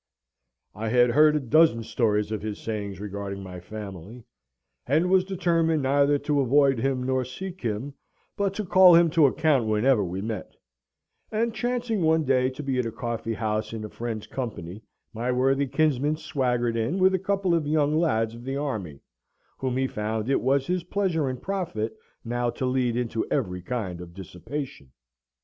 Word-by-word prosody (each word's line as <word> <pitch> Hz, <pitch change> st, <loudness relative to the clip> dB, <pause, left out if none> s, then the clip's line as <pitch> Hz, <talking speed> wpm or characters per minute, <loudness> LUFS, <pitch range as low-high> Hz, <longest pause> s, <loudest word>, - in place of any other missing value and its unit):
I 110 Hz, +2 st, -4 dB
had 120 Hz, +1 st, +4 dB
heard 150 Hz, +4 st, +5 dB
a -, -, +2 dB
dozen 135 Hz, -3 st, +3 dB
stories 105 Hz, -2 st, 0 dB
of 110 Hz, -, -2 dB
his 105 Hz, -1 st, -4 dB
sayings 100 Hz, -4 st, -4 dB
regarding 100 Hz, -1 st, -5 dB
my 90 Hz, -1 st, -8 dB
family, 105 Hz, +3 st, -9 dB, 0.6 s
and 160 Hz, +7 st, +2 dB
was 190 Hz, -1 st, +5 dB
determined 165 Hz, -5 st, +1 dB
neither 140 Hz, +2 st, +3 dB
to 145 Hz, 0 st, 0 dB
avoid 135 Hz, 0 st, +3 dB
him 130 Hz, +1 st, 0 dB
nor 130 Hz, 0 st, 0 dB
seek 185 Hz, +9 st, -7 dB
him; 120 Hz, +5 st, -3 dB, 0.4 s
but 200 Hz, -2 st, -1 dB
to 215 Hz, -, -3 dB
call 185 Hz, -1 st, +7 dB
him 170 Hz, -1 st, +5 dB
to 160 Hz, -3 st, +5 dB
account 140 Hz, -5 st, +2 dB
whensoever 110 Hz, +1 st, +3 dB
we 95 Hz, +2 st, -4 dB
met; 110 Hz, -3 st, -5 dB, 0.8 s
and, 225 Hz, +1 st, 0 dB
chancing 240 Hz, -3 st, -1 dB
one 160 Hz, 0 st, +3 dB
day 130 Hz, -2 st, +2 dB
to 130 Hz, +3 st, -8 dB
be 135 Hz, -2 st, -1 dB
at 125 Hz, -, 0 dB
a -, -, -4 dB
coffee 115 Hz, -1 st, -3 dB
house 110 Hz, +1 st, -2 dB
in 110 Hz, -1 st, -5 dB
a -, -, -7 dB
friend's 115 Hz, -2 st, -5 dB
company, 105 Hz, -7 st, -6 dB, 0.3 s
my 120 Hz, +3 st, -1 dB
worthy 135 Hz, +2 st, +2 dB
kinsman 150 Hz, +1 st, +1 dB
swaggered 125 Hz, -6 st, -1 dB
in 115 Hz, +10 st, -1 dB
with 190 Hz, 0 st, +4 dB
a 190 Hz, -, +1 dB
couple 195 Hz, -1 st, 0 dB
of 160 Hz, -3 st, +1 dB
young 150 Hz, 0 st, +2 dB
lads 115 Hz, -9 st, +1 dB
of 115 Hz, +1 st, -10 dB
the 135 Hz, +2 st, -3 dB
army, 105 Hz, -, -4 dB, 0.6 s
whom 130 Hz, -1 st, -1 dB
he 130 Hz, -, +1 dB
found 110 Hz, 0 st, -2 dB
it -, -, +2 dB
was 135 Hz, +1 st, +2 dB
his 180 Hz, +1 st, -1 dB
pleasure 180 Hz, -7 st, 0 dB
and 130 Hz, -1 st, -6 dB
profit 170 Hz, -, -3 dB, 0.3 s
now 120 Hz, +1 st, -1 dB
to 130 Hz, -, -3 dB
lead 125 Hz, -2 st, 0 dB
into 115 Hz, -2 st, -1 dB
every 90 Hz, -10 st, -1 dB
kind 95 Hz, -4 st, -4 dB
of 85 Hz, -1 st, -11 dB
dissipation. 95 Hz, -, -7 dB
130 Hz, 180 wpm, -26 LUFS, 110-155 Hz, 0.8 s, call